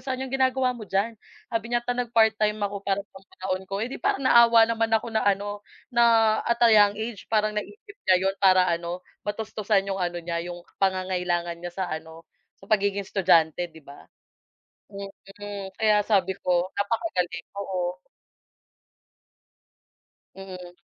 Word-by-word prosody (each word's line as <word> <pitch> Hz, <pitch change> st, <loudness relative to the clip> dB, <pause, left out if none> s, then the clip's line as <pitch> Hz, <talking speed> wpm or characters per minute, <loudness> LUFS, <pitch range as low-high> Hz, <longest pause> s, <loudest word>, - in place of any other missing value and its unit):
sa 260 Hz, -, -1 dB
kanya, 265 Hz, -, -4 dB
"Anong 270 Hz, -, -1 dB
ginagawa 260 Hz, -1 st, +2 dB
mo 230 Hz, -4 st, -9 dB
diyan?" 200 Hz, +4 st, 0 dB, 0.4 s
sabi 225 Hz, -1 st, -1 dB
niya, 240 Hz, 0 st, 0 dB
"Ta 245 Hz, -, 0 dB
nagpart-time 220 Hz, -3 st, +2 dB
ako 200 Hz, 0 st, -2 dB
para 200 Hz, 0 st, 0 dB
pambaon 190 Hz, -1 st, -6 dB
ko," 195 Hz, +2 st, -3 dB
eh, 250 Hz, -, -6 dB
di -, -, -6 dB
parang 270 Hz, -, 0 dB
naawa 235 Hz, -2 st, +7 dB
naman 225 Hz, 0 st, 0 dB
ako 225 Hz, +1 st, -5 dB
na 220 Hz, -, +1 dB
ano, 205 Hz, +1 st, 0 dB, 0.3 s
na 230 Hz, -2 st, +4 dB
at 235 Hz, -, +2 dB
a 230 Hz, -, +7 dB
young 205 Hz, -1 st, +6 dB
age 220 Hz, -2 st, -6 dB
parang 215 Hz, -1 st, +1 dB
naisip 410 Hz, -, -10 dB
niya 185 Hz, -, +7 dB
'yon 195 Hz, 0 st, +1 dB
para 185 Hz, -2 st, +5 dB
ano 170 Hz, +1 st, -3 dB, 0.2 s
matustusan 210 Hz, -1 st, -1 dB
'yong 195 Hz, -1 st, -3 dB
ano 175 Hz, -1 st, -1 dB
niya 170 Hz, 0 st, -2 dB
'yong 175 Hz, 0 st, -7 dB, 0.2 s
pangangailangan 180 Hz, -3 st, 0 dB
niya 175 Hz, 0 st, -7 dB
sa 190 Hz, 0 st, -2 dB
ano 160 Hz, +1 st, -7 dB, 0.3 s
sa -, -, -17 dB
pagiging 200 Hz, -1 st, +1 dB
estudyante 175 Hz, -3 st, +2 dB
'di 160 Hz, -1 st, -16 dB
ba? 140 Hz, -, -14 dB, 0.9 s
Mm, 200 Hz, 0 st, -8 dB
kaya 210 Hz, -1 st, +3 dB
sabi 190 Hz, -3 st, +1 dB
ko, 180 Hz, 0 st, 0 dB
"napakagaling," 195 Hz, -, -2 dB
oo. 180 Hz, -2 st, -3 dB, 2.4 s
Mm. 185 Hz, -2 st, -9 dB
200 Hz, 155 wpm, -25 LUFS, 185-220 Hz, 2.4 s, naawa